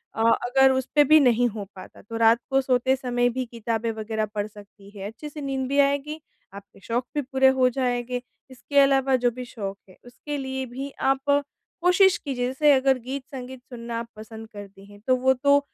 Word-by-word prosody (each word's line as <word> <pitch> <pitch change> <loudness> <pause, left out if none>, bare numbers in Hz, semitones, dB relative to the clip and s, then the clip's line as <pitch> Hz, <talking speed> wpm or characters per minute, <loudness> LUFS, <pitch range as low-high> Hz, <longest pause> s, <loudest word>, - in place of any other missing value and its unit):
अ, 225 - -2 0.2
अगर 265 +2 +4
उस 260 0 -1
पे 295 - +7
भी 310 +2 +6
नहीं 245 -3 +3
हो 210 -2 -6
पाता 185 - -12
तो 225 +3 -7
रात 230 +1 +5
को 270 0 +3
सोते 260 0 +2
समय 245 -2 0
भी 255 +1 -3
किताबें 230 -1 -3
वग़ैरह 220 0 -3
पढ़ 205 0 -1
सकती 205 -1 -16
हैं। 195 - -6
अच्छे 225 +8 -9
से 295 0 -9
नींद 270 -2 -2
भी 280 +1 +1
आएगी, 285 +2 +1 0.3
आपके 200 0 -13
शौक 240 +4 -2
भी 295 - +1
पूरे 265 0 +2
हो 255 0 +5
जाएँगे। 245 -1 -2 0.3
इसके 270 +3 -5
अलावा 270 -1 +4
जो 245 - +3
भी 250 +2 -7
शौक 200 -5 -6
हैं 185 - -17
उसके 290 +4 -7
लिए 265 -1 -4
भी 260 +3 -6 0.2
आप 270 0 +2 0.6
कोशिश 360 +2 +5
कीजिए 260 -4 -3
जैसे 290 +4 +3
अगर 265 0 +3
गीत-संगीत 260 0 -7
सुनना 235 -2 -6
आप 230 - -6
पसंद 220 +1 -10
करती 200 -1 -11
हैं 205 - -15
तो 255 - +4
वो 260 +1 +3
तो 280 +2 +3
255 Hz, 200 wpm, -24 LUFS, 230-270 Hz, 0.6 s, पे